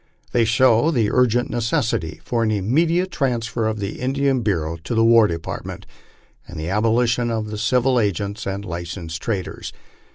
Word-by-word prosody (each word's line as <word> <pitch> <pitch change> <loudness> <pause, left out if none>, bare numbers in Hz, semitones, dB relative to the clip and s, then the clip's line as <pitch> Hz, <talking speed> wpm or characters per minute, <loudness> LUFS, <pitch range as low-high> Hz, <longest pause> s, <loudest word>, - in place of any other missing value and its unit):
They 120 -1 +3
show 120 +4 +4
the 120 -9 +1
urgent 125 -1 +2
necessity 115 -8 -1
for 120 -1 -1
an 110 - +1
immediate 160 - +1
transfer 120 -6 -1
of 110 -1 -2
the 100 0 -5
Indian 135 0 0
Bureau 85 -7 -1
to 85 +9 -5
the 115 - +3
War 115 -1 +6
Department, 85 -2 -6 0.6
and 85 - -8
the 80 +2 -4
abolition 115 +3 +1
of 110 -2 -3
the 105 - -4
civil 125 +2 +2
agents 100 0 -2
and 100 +1 -4
licet, 85 -1 -6
sed 80 0 -5
traders. 100 -5 -4
115 Hz, 165 wpm, -21 LUFS, 100-125 Hz, 0.6 s, War